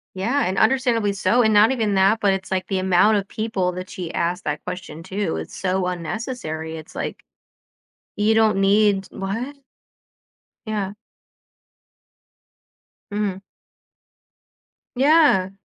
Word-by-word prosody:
Yeah, 235 Hz, +10 st, 0 dB
and 190 Hz, +1 st, -2 dB
understandably 230 Hz, -3 st, +2 dB
so, 195 Hz, +5 st, +2 dB
and 220 Hz, -2 st, +3 dB
not 210 Hz, +3 st, +6 dB
even 220 Hz, -6 st, 0 dB
that, 195 Hz, +3 st, +4 dB
but 200 Hz, -3 st, +3 dB
it's 195 Hz, 0 st, -5 dB
like 185 Hz, -1 st, -1 dB
the 190 Hz, -2 st, -1 dB
amount 190 Hz, +3 st, +4 dB
of 200 Hz, -1 st, -3 dB
people 215 Hz, -5 st, -1 dB
that 185 Hz, +1 st, -7 dB
she 175 Hz, -3 st, -6 dB
asked 175 Hz, +3 st, -1 dB
that 150 Hz, 0 st, -3 dB
question 180 Hz, -3 st, -7 dB
to, 195 Hz, -, -2 dB
it's 80 Hz, 0 st, -7 dB
so 185 Hz, 0 st, -1 dB
unnecessary, 170 Hz, -3 st, -4 dB
it's 160 Hz, +2 st, -11 dB
like, -, -, -5 dB, 0.9 s
you 210 Hz, +1 st, +2 dB
don't 215 Hz, -3 st, +3 dB
need 200 Hz, 0 st, +3 dB
what? 230 Hz, +9 st, -4 dB, 1.1 s
Yeah. 205 Hz, -3 st, -3 dB, 2.2 s
Mhm. 205 Hz, -2 st, -2 dB, 1.5 s
Yeah. 275 Hz, -, +4 dB
195 Hz, 125 wpm, -22 LUFS, 185-220 Hz, 2.2 s, not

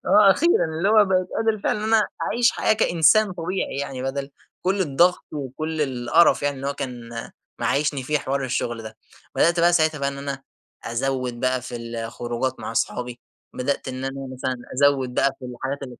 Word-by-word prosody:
آه 210 Hz, -2 st, +7 dB
أخيرًا 325 Hz, -, +3 dB
اللي 160 Hz, +4 st, -1 dB
هو 215 Hz, -1 st, +6 dB
بقيت 185 Hz, -1 st, +1 dB
قادر 225 Hz, -1 st, +1 dB
فعلًا -, -, +1 dB
إن 215 Hz, -, -4 dB
أنا 215 Hz, -1 st, +4 dB, 0.2 s
أعيش 235 Hz, 0 st, +3 dB
حياة -, -, +2 dB
كإنسان 200 Hz, 0 st, +4 dB
طبيعي 180 Hz, -3 st, -3 dB
يعني، 135 Hz, -2 st, -5 dB
بدل 135 Hz, +1 st, -3 dB, 0.3 s
كلّ 190 Hz, +2 st, +1 dB
الضغط 175 Hz, +2 st, +3 dB
وكلّ 155 Hz, +3 st, -4 dB
القَرَف 135 Hz, +5 st, +3 dB
يعني 145 Hz, -1 st, 0 dB
اللي 135 Hz, -, -5 dB
هو -, -, -1 dB
كان 125 Hz, -4 st, -6 dB, 0.5 s
معيشني 145 Hz, -1 st, 0 dB
فيه 150 Hz, +3 st, 0 dB
حوار 135 Hz, 0 st, -2 dB
الشغل 120 Hz, -2 st, -2 dB
ده، 110 Hz, 0 st, -9 dB, 0.4 s
بدأت 170 Hz, 0 st, +3 dB
بقى 175 Hz, +1 st, +5 dB
ساعتها 155 Hz, -2 st, +2 dB
بقى 140 Hz, -, 0 dB
إن 140 Hz, 0 st, -6 dB
أنا 140 Hz, -1 st, -5 dB, 0.4 s
أزوّد 125 Hz, 0 st, -2 dB
بقى 130 Hz, 0 st, +1 dB
في 125 Hz, -1 st, -6 dB
الخروجات 120 Hz, +2 st, -4 dB
مع -, -, -5 dB
أصحابي، 120 Hz, +1 st, -2 dB, 0.3 s
بدأت 135 Hz, +1 st, -2 dB
إن 130 Hz, 0 st, -5 dB
أنا 135 Hz, 0 st, -5 dB
مثلًا 130 Hz, 0 st, -3 dB, 0.2 s
أزوّد 135 Hz, -2 st, +2 dB
بقى 135 Hz, -, +3 dB
في 130 Hz, -, -11 dB
الحاجات 130 Hz, +3 st, -4 dB
اللي 125 Hz, -3 st, -8 dB
140 Hz, 185 wpm, -23 LUFS, 125-170 Hz, 0.5 s, آه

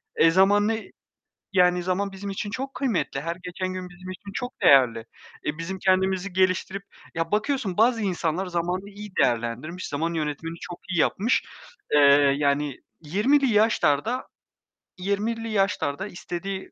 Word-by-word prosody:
E, 165 Hz, +1 st, +5 dB
zaman 200 Hz, +3 st, +4 dB
ne? 225 Hz, 0 st, -1 dB, 0.7 s
Yani, 180 Hz, -1 st, +4 dB
zaman 195 Hz, +2 st, -1 dB
bizim 200 Hz, +1 st, -7 dB
için 200 Hz, +1 st, -4 dB
çok 270 Hz, +5 st, -5 dB
kıymetli. 210 Hz, -, -1 dB
Her 170 Hz, +2 st, -3 dB
geçen 185 Hz, +1 st, -4 dB
gün 185 Hz, -1 st, -6 dB
bizim 185 Hz, +1 st, -11 dB
için 200 Hz, +2 st, -9 dB
çok 245 Hz, +3 st, -5 dB
değerli. 125 Hz, -5 st, +6 dB, 0.5 s
E, 150 Hz, +1 st, -2 dB
bizim 185 Hz, +3 st, -5 dB
kendimizi 190 Hz, 0 st, +1 dB
geliştirip 185 Hz, +1 st, +1 dB, 0.3 s
ya, 165 Hz, +3 st, -2 dB
bakıyorsun 215 Hz, -3 st, 0 dB
bazı 230 Hz, 0 st, +4 dB
insanlar 180 Hz, -2 st, -1 dB
zamanını 180 Hz, +3 st, -2 dB
iyi 205 Hz, 0 st, -9 dB
değerlendirmiş, 120 Hz, +10 st, -1 dB
zaman 165 Hz, +4 st, -2 dB
yönetimini 160 Hz, +1 st, -3 dB
çok 175 Hz, -, -8 dB
iyi 175 Hz, -3 st, 0 dB
yapmış. 220 Hz, +10 st, +2 dB, 0.5 s
Eee, 150 Hz, -, +6 dB, 0.4 s
yani 145 Hz, -1 st, 0 dB, 0.2 s
20'li 235 Hz, -, +2 dB
yaşlarda 210 Hz, -, +2 dB, 0.7 s
20'li 215 Hz, +4 st, -2 dB
yaşlarda 195 Hz, -4 st, 0 dB
istediği, 190 Hz, +1 st, -6 dB
185 Hz, 140 wpm, -25 LUFS, 165-205 Hz, 0.7 s, değerli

